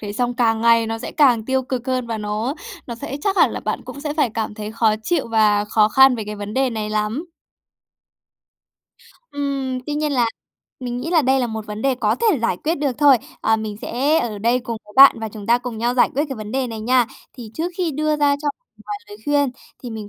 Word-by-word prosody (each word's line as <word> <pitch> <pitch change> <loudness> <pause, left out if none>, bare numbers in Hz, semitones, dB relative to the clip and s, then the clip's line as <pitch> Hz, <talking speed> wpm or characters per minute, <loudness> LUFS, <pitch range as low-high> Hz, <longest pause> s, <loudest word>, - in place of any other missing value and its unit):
thế 205 -1 -5
xong 245 +2 -1
càng 225 -2 +2
ngày 230 -1 +4
nó 225 0 -3
sẽ - - -6
càng 250 -7 +4
tiêu 265 +1 0
cực 255 -1 -4
hơn 255 -2 -1
và 225 -1 -3
nó 215 +5 -2 0.3
nó 235 - -5
sẽ 260 +4 -6
chắc 400 -1 0
hẳn - - +5
là - - -5
bạn - - -3
cũng 280 - -9
sẽ 295 0 -3
phải 290 -7 +1
cảm 220 -2 -3
thấy 210 0 -6
khó 220 -1 +2
chịu 335 -1 0
và 210 -2 +3
khó 215 0 +3
khăn 265 +3 +6
về 220 - -4
cái 210 0 -6
vấn 205 +1 -6
đề 265 -1 +1
này 215 -2 -4
lắm. 215 +10 -2 2.0
Ừm. 275 -2 -2
Tuy 295 - -2
nhiên 300 -1 -1
là 245 -3 +2 0.5
mình 245 -1 -4
nghĩ 330 - -4
là 330 -3 +4
đây 265 0 +2
là 245 - 0
một 220 -2 -6
vấn 210 +1 -6
đề 270 -1 +2
có 250 - +1
thể 435 - +2
giải 185 - +1
quyết 320 - -1
được 285 -4 -1
thôi. 285 -3 +7 0.2
À, 220 0 +2
mình 215 -1 -5
sẽ 285 +6 +1
ở 215 -3 -3
đây 235 +4 +2
cùng 235 -2 -5
với 210 - -16
bạn 275 0 +9
và 220 - -3
chúng 210 -1 -10
ta 235 +1 +4
cùng 245 -2 -6
nhau 240 +2 0
giải 250 - +4
quyết 285 +3 +1
cái 270 - -5
vấn 215 0 -7
đề 265 0 0
này 225 -2 -6
nha. 245 +1 +3 0.3
Thì 235 -4 -9
trước 345 +3 -3
khi 350 -3 0
đưa 305 +1 0
ra 290 -1 +3
cho 295 - 0 0.4
vài 415 - -3
lời 415 - -10
khuyên 285 -2 +2 0.3
thì 245 - -6
mình 215 -2 -7
245 Hz, 250 wpm, -21 LUFS, 220-280 Hz, 2.0 s, bạn